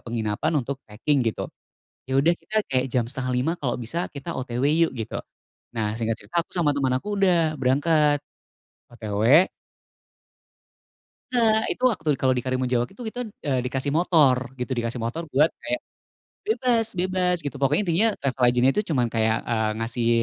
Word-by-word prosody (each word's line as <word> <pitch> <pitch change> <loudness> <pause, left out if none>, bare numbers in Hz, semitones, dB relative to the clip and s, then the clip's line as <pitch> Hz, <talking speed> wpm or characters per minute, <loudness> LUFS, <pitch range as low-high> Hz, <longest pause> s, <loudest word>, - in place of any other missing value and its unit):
penginapan 115 +5 -2
untuk 135 0 -2
packing 130 +7 0
gitu. 115 - -1 0.6
Ya 130 +1 +1
udah 165 +5 +3
kita 215 - -10
kayak 130 -2 +1
jam 120 -2 +1
4.30 130 +2 0
kalau 135 -8 -2
bisa 160 +10 -3
kita 140 -2 -6
OTW 125 -1 -3 0.2
yuk - - -9
gitu. 115 -4 -5 0.6
Nah 110 -1 -1
singkat 115 0 -2
cerita 170 -1 -2
aku - - -40
sama 170 -5 +2
temen 135 -2 +1
aku 205 +11 -3
udah 170 -5 +3
berangkat. 145 +3 +3 0.7
OTW. 115 - +3 1.8
Enggak, 220 -3 +3
itu - - -11
waktu 160 -9 -3
kalau 130 -1 +3
di 125 - -1
Karimunjawa 130 -2 0
itu 220 +5 -11
kita, 245 +3 -6 0.3
eee, 130 -3 +1
dikasih 135 +2 -1
motor 140 -7 +3
gitu, 125 +2 -3
dikasih 120 +1 -2
motor 120 +9 -3
buat 150 +5 +4
kayak 305 0 -2 0.6
bebas, 250 - +2
bebas 180 0 +1
gitu 145 - -4
pokoknya. 135 +8 +3
Intinya 175 +6 +3
travel 130 -2 -2
agent 125 +1 +3
itu 210 - +1
cuman 125 -4 +2
kayak, 110 0 +2
eee, 110 -2 0
kasih 115 0 -1
135 Hz, 160 wpm, -24 LUFS, 120-170 Hz, 1.8 s, buat